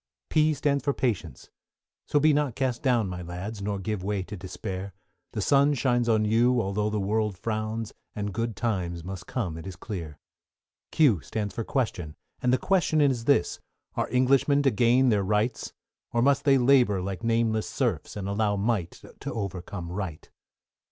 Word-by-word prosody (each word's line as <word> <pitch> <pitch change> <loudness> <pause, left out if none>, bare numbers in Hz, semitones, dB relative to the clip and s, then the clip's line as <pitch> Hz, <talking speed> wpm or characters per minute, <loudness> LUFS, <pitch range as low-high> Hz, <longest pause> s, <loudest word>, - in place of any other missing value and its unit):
=P= 155 0 +3
stands 140 -1 0
for 140 - 0
Patience, 120 -7 -3 0.6
so 145 - +3
be 155 +1 +5
not 145 -5 0
cast 130 -3 -1
down, 120 -6 +2
My 90 -1 -5
lads, 90 +5 -6
nor 100 0 -2
give 100 0 -3
way 100 -1 -1
to 105 - -8
despair; 95 0 -6 0.4
The - - -2
sun 140 +1 +4
shines 120 -2 +1
on 110 -1 +3
you, 120 +3 +3
although 105 0 0
the 105 0 -1
world 105 0 0
frowns, 110 +1 -3 0.2
And 105 -1 -3
good 115 +1 -2
times 90 -7 -2
must 95 0 -7
come 90 -11 -3
it 80 - -9
is 95 - -6
clear. 85 -6 -6 0.7
=Q= 125 - +4
stands 105 +2 -4
for 115 - -3
Question, 95 - -2 0.3
and 125 - +2
the 130 - +4
Question 175 -3 +2
is 130 -6 +2
this, 140 -10 +2 0.3
Are - - -1
Englishmen 135 +3 +3
to 135 - +4
gain 120 +4 +4
their 105 -3 +3
Rights? 105 +4 0 0.4
Or 120 0 +1
must 140 +1 +3
they 135 -2 +6
labour 125 -6 +4
like 95 +3 -4
nameless 115 -1 +1
serfs, - - -2
And 100 -2 -4
allow 105 +1 +1
Might 100 -4 -2 0.2
to - - -5
overcome 90 -3 -5
Right? 90 -5 -5
110 Hz, 175 wpm, -27 LUFS, 95-125 Hz, 0.7 s, they